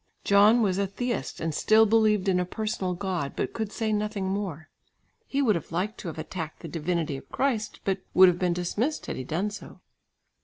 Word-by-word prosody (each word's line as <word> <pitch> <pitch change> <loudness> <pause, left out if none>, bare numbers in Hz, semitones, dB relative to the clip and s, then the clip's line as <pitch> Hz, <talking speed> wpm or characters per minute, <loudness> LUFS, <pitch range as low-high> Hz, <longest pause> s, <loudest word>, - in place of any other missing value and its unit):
John 210 +4 +5
was 190 -2 +1
a 200 - +1
theist, 240 +5 -3
and 165 -1 -2
still 220 +8 +5
believed 215 -2 +3
in 185 -2 +3
a - - +2
personal 195 -1 -3
God, 180 -7 -3
but - - -2
could 220 -2 -3
say 220 -2 -1
nothing 210 -1 -1
more. 190 -6 -3 0.6
He 280 +1 0
would 225 -5 +4
have 170 -4 -5
liked 185 +6 -2
to - - -7
have 160 - -6
attacked 160 0 -6
the - - -7
divinity 165 -2 -2
of - - -13
Christ, 235 -6 -1
but 195 -1 0 0.2
would 185 0 +9
have 180 -1 +2
been 180 -1 +1
dismissed 205 - -2
had - - -4
he 130 - -5
done 180 +10 -2
so. 205 - -10
195 Hz, 205 wpm, -27 LUFS, 175-215 Hz, 0.6 s, would